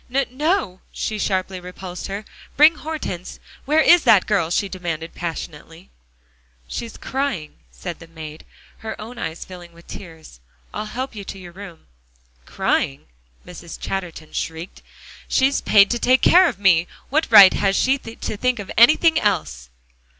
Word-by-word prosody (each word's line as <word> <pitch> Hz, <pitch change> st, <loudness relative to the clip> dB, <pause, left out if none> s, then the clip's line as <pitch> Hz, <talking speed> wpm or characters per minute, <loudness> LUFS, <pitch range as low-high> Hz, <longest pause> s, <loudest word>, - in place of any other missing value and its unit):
"No 270 Hz, +2 st, +1 dB
no," 295 Hz, -, -1 dB
she 215 Hz, -1 st, -4 dB
sharply 190 Hz, -2 st, -1 dB
repulsed 180 Hz, 0 st, -8 dB
her. 200 Hz, +2 st, -6 dB, 0.3 s
"Bring 305 Hz, +3 st, +7 dB
Hortense 305 Hz, -, -6 dB, 0.3 s
where 305 Hz, +3 st, +3 dB
is 345 Hz, +1 st, +6 dB
that 200 Hz, -4 st, +5 dB
girl?" 195 Hz, -6 st, +1 dB
she 195 Hz, +3 st, 0 dB
demanded 170 Hz, -4 st, -5 dB
passionately. 165 Hz, 0 st, -7 dB, 0.8 s
"She's 230 Hz, -, -6 dB
crying," 265 Hz, -, -3 dB
said 175 Hz, -3 st, -8 dB
the 165 Hz, -, -13 dB
maid, 160 Hz, -1 st, -10 dB, 0.4 s
her 220 Hz, 0 st, -7 dB
own 235 Hz, +3 st, -9 dB
eyes 160 Hz, -3 st, -5 dB
filling 175 Hz, -2 st, -12 dB
with 170 Hz, 0 st, -18 dB
tears. 160 Hz, -, -11 dB, 0.3 s
"I'll 210 Hz, -, -4 dB
help 255 Hz, +5 st, -5 dB
you 205 Hz, -2 st, -7 dB
to 195 Hz, -, -7 dB
your 180 Hz, -2 st, -11 dB
room." 185 Hz, -, -12 dB, 0.6 s
"Crying?" 70 Hz, -, -1 dB, 0.4 s
Madame 175 Hz, -1 st, -11 dB
Chatterton 175 Hz, -5 st, -5 dB
shrieked. 165 Hz, +3 st, -5 dB, 0.5 s
"She's 270 Hz, +1 st, +2 dB
paid 200 Hz, -1 st, +5 dB
to 240 Hz, -, 0 dB
take 255 Hz, +2 st, +3 dB
care 365 Hz, +1 st, +7 dB
of 235 Hz, -, -7 dB
me; 175 Hz, -4 st, +3 dB, 0.2 s
what 310 Hz, +3 st, +1 dB
right 195 Hz, -2 st, +10 dB
has 195 Hz, -1 st, +1 dB
she 270 Hz, +5 st, +2 dB
to 225 Hz, -3 st, -6 dB
think 250 Hz, +3 st, 0 dB
of 205 Hz, -2 st, -7 dB
anything 315 Hz, +7 st, +5 dB
else?" 75 Hz, -, -2 dB
195 Hz, 155 wpm, -21 LUFS, 170-250 Hz, 0.8 s, right